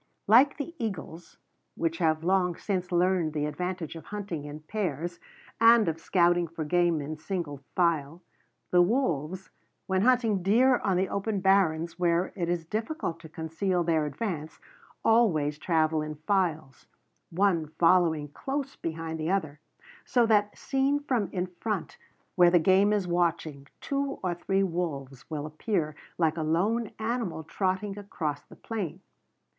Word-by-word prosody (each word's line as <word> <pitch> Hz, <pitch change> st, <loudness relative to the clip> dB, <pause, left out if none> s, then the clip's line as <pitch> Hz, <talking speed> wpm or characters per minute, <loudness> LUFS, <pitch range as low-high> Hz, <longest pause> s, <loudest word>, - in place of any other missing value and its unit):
Like 250 Hz, +7 st, +6 dB
the 310 Hz, +3 st, -5 dB
eagles 175 Hz, -6 st, -6 dB, 0.4 s
which 165 Hz, 0 st, -1 dB
have 160 Hz, -2 st, +1 dB
long 180 Hz, -1 st, +2 dB
since 185 Hz, -2 st, -3 dB
learned 175 Hz, -2 st, +2 dB
the 150 Hz, -1 st, -1 dB
advantage 180 Hz, +1 st, -4 dB
of 165 Hz, -, -9 dB
hunting 195 Hz, -8 st, -5 dB
in 150 Hz, +1 st, -8 dB
pairs 170 Hz, -2 st, -3 dB, 0.4 s
and 230 Hz, -2 st, +6 dB
of 165 Hz, 0 st, -1 dB
scouting 175 Hz, 0 st, +2 dB
for 160 Hz, -1 st, -5 dB
game 175 Hz, 0 st, +2 dB
in 155 Hz, +2 st, -5 dB
single 160 Hz, -4 st, -4 dB, 0.2 s
file 170 Hz, -1 st, 0 dB, 0.5 s
the 180 Hz, -, +6 dB
wolves, 180 Hz, -, 0 dB, 0.3 s
when 190 Hz, -1 st, +1 dB
hunting 230 Hz, -4 st, +3 dB
deer 245 Hz, +7 st, +4 dB
on 190 Hz, -3 st, 0 dB
the 190 Hz, +1 st, +1 dB
open 200 Hz, +1 st, -2 dB
barrens 170 Hz, -3 st, +2 dB
where 175 Hz, +1 st, +1 dB
it 170 Hz, -3 st, -2 dB
is 175 Hz, -2 st, -1 dB
difficult 215 Hz, -, -3 dB
to 160 Hz, -, -12 dB
conceal 165 Hz, +3 st, -1 dB
their 160 Hz, -2 st, +1 dB
advance, 155 Hz, 0 st, -4 dB, 0.5 s
always 160 Hz, -11 st, +3 dB
travel 160 Hz, -2 st, +1 dB
in 155 Hz, 0 st, -5 dB
files, 165 Hz, -9 st, -1 dB, 0.4 s
one 175 Hz, -3 st, +1 dB
following 165 Hz, -4 st, +3 dB
close 275 Hz, -, -4 dB
behind 160 Hz, 0 st, -5 dB
the 155 Hz, +1 st, -2 dB
other; 155 Hz, -7 st, -1 dB, 0.4 s
so 245 Hz, -3 st, +3 dB
that, 210 Hz, -2 st, +2 dB
seen 275 Hz, +1 st, +1 dB
from 250 Hz, -9 st, -1 dB
in 180 Hz, -2 st, -1 dB
front 185 Hz, +2 st, -4 dB, 0.3 s
where 175 Hz, -1 st, +6 dB
the 175 Hz, -, +5 dB
game 190 Hz, +4 st, +4 dB
is 205 Hz, -3 st, 0 dB
watching, 165 Hz, -5 st, -1 dB
two 275 Hz, 0 st, -2 dB
or 180 Hz, -2 st, 0 dB
three 195 Hz, +3 st, 0 dB
wolves 140 Hz, -8 st, -4 dB
will 150 Hz, -2 st, -4 dB
appear 155 Hz, 0 st, -2 dB, 0.2 s
like 160 Hz, -1 st, +1 dB
a -, -, -1 dB
lone 200 Hz, +9 st, +1 dB
animal 220 Hz, -7 st, -2 dB
trotting 195 Hz, +4 st, -2 dB
across 155 Hz, -8 st, -4 dB
the -, -, -16 dB
plain. 210 Hz, -8 st, -5 dB
175 Hz, 150 wpm, -28 LUFS, 160-200 Hz, 0.5 s, Like